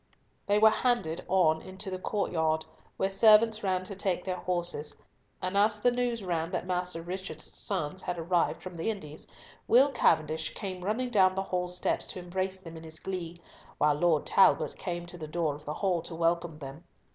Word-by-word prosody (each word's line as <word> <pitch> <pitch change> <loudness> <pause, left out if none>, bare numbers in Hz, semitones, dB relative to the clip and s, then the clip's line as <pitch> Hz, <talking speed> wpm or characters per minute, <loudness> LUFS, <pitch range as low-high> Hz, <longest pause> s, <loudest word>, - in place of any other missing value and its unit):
They 205 0 +3
were 220 +1 +7
handed 215 -9 0
on 160 -4 +3
into 190 +1 -7
the 185 - -4
courtyard, 160 -6 0 0.3
where 195 - 0
servants 215 +2 +6
ran 185 -2 0
to 195 +1 -6
take 185 -2 -1
their 185 -1 -2
horses, 175 -4 -3 0.5
and 185 +1 -2
as 210 +1 +3
the 245 +3 +3
news 240 -3 -1
ran 165 -3 -1
that 180 - -3
Master 180 -2 -2
Richard's 185 +2 -5
sons 185 -2 -3
had 180 - -3
arrived 170 +1 0
from 185 -2 -8
the 165 - -1
Indies, 155 -8 -6 0.4
Will 270 +4 +6
Cavendish 155 - +1
came 185 -2 -5
running 235 +6 -1
down 190 -4 +4
the 195 - -1
hall 180 -2 -2
steps 180 0 -1
to - - -5
embrace 185 +1 -3
them 165 -2 -9
in 160 - -10
his 160 -1 -10
glee, 175 -2 -5 0.4
while 150 0 +4
Lord 155 0 +2
Talbot 195 - +4
came 175 -2 -4
to 175 0 -9
the 155 - -6
door 160 -1 -1
of 150 +1 -11
the 150 - -4
hall 185 -4 0
to 165 - -7
welcome 170 -1 0
them. 140 +2 -9
180 Hz, 190 wpm, -29 LUFS, 165-195 Hz, 0.5 s, were